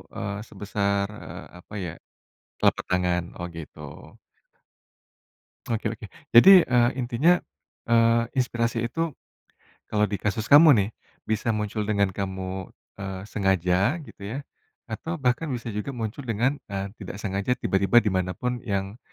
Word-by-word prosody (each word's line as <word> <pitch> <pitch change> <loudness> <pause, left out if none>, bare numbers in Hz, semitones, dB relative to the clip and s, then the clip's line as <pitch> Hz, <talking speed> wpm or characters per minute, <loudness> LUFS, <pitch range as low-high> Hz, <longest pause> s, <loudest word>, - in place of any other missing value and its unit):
eee, 100 0 -3
sebesar 100 0 -1 0.2
eee, - - -9
apa 105 - -16
ya, 80 - -4 0.7
telapak - - +2
tangan? 90 -1 +1 0.2
Oh, 85 - -3
gitu. 80 -3 -9 1.9
Oke 115 -1 -2
oke. 110 0 -10 0.3
Jadi, 180 +9 +9
eee, 120 -1 +4
intinya, 130 +8 +3 0.5
eee, 115 0 +4
inspirasi 120 -3 0
itu 165 +1 -2 0.7
kalau 105 0 +1
di 100 - -2
kasus 110 +3 -2
kamu 155 +3 +9
nih, 100 - 0 0.3
bisa 110 +1 -1
muncul 105 0 -2
dengan 100 -2 +2
kamu, 95 -1 -4 0.3
eee, 95 -1 -5
sengaja 95 - +1
gitu 120 - -14
ya, 120 +7 -4 0.5
atau 160 +9 -4
bahkan 135 +1 0
bisa 120 -1 -5
juga 105 +6 -4
muncul 115 +3 -5
dengan, 120 +6 0
eee, 100 -1 -4
tidak 100 -1 -7
sengaja 100 +3 -1
tiba-tiba 100 +5 +4
dimanapun 95 +5 -1
yang, 100 +2 -2
105 Hz, 130 wpm, -25 LUFS, 95-120 Hz, 1.9 s, Jadi